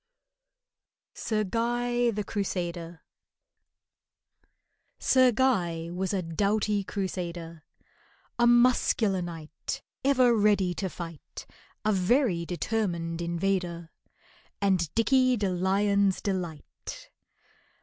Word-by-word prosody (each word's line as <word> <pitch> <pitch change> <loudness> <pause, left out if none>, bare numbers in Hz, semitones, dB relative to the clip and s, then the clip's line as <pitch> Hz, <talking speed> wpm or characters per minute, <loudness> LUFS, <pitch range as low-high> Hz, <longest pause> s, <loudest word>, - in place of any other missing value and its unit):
SIR 215 -2 -1
GUY 240 +3 0
THE 210 -2 -2
CRUSADER 175 -4 -4 1.9
SIR 255 -1 +4
GUY 175 -10 0
was 185 +1 -2
a 190 -3 -1
doughty 205 +4 0
crusader, 175 -5 -5 0.8
A 240 - +5
muscular 240 -5 +3
knight, 165 -3 -6 0.2
Ever 255 -3 +4
ready 205 -4 +3
to 190 +1 -3
fight, 165 -3 -9 0.4
A 215 - +3
very 190 - +2
determined 175 -4 -2
invader, 170 -1 -2 0.7
And 185 -6 +1
DICKEY 255 +2 +3
DE 205 -2 0
LION'S 195 +2 +2
delight. 190 - -5
195 Hz, 90 wpm, -28 LUFS, 170-225 Hz, 1.9 s, A